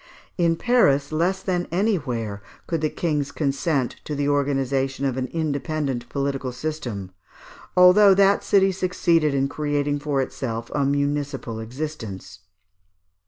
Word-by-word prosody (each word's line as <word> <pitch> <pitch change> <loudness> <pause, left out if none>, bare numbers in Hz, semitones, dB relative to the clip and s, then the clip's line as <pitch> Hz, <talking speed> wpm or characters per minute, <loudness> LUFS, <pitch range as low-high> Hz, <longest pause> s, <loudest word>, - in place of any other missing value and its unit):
] - - -34
In 165 0 +3
Paris, 160 - +2
less 180 +5 0
than 180 -2 -1
anywhere, 130 - -1 0.2
could 165 -3 -2
the 155 - +1
kings 150 -4 -2
consent 140 -2 -1
to 150 - -4
the 145 0 -1
organization 135 -1 0
of 130 -3 0
an 130 -1 -2
independent 145 -4 -2
political 140 -2 -2
System, 125 -8 -5 0.7
although 190 +2 +7
that 200 +1 +4
city 195 -1 +4
succeeded 170 -5 +1
in 135 0 +1
creating 145 0 -1
for 145 -1 -1
itself 115 -3 -4
a 140 -2 +1
municipal 140 -4 -1
existence. 115 -6 -6
145 Hz, 130 wpm, -23 LUFS, 135-165 Hz, 0.7 s, although